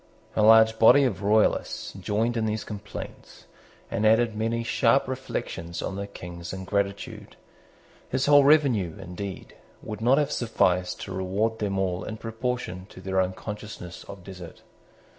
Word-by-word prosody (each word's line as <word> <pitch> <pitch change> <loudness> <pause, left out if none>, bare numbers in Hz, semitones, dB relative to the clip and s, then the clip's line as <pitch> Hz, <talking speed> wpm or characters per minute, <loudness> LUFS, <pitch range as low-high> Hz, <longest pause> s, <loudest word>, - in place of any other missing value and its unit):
A - - +2
large 110 +1 +6
body 140 +5 +7
of 110 -7 0
Royalists 105 +2 +1
joined 105 +5 -1
in 110 -1 0
these 110 0 -2
complaints, 105 -2 -9 0.5
and 115 -2 -1
added 110 +1 +4
many 115 +2 -1
sharp 115 +3 +2
reflections 85 -9 -5
on 95 - -3
the 100 0 -4
King's 90 -3 -8
ingratitude. 100 +1 -3 0.7
His 130 +1 0
whole 145 -1 +7
revenue, 135 - +3
indeed, 95 +1 -7 0.3
would 105 0 -6
not 125 +4 +4
have 150 -2 +1
sufficed 90 -6 +1
to 95 - -6
reward 100 +5 -1
them 100 -2 -1
all 95 0 -1
in 110 - -6
proportion 115 -5 -4
to - - -13
their 95 0 0
own 95 0 -1
consciousness 105 -3 -8
of 100 -2 -10
desert. 90 -2 -10
105 Hz, 150 wpm, -26 LUFS, 95-115 Hz, 0.7 s, body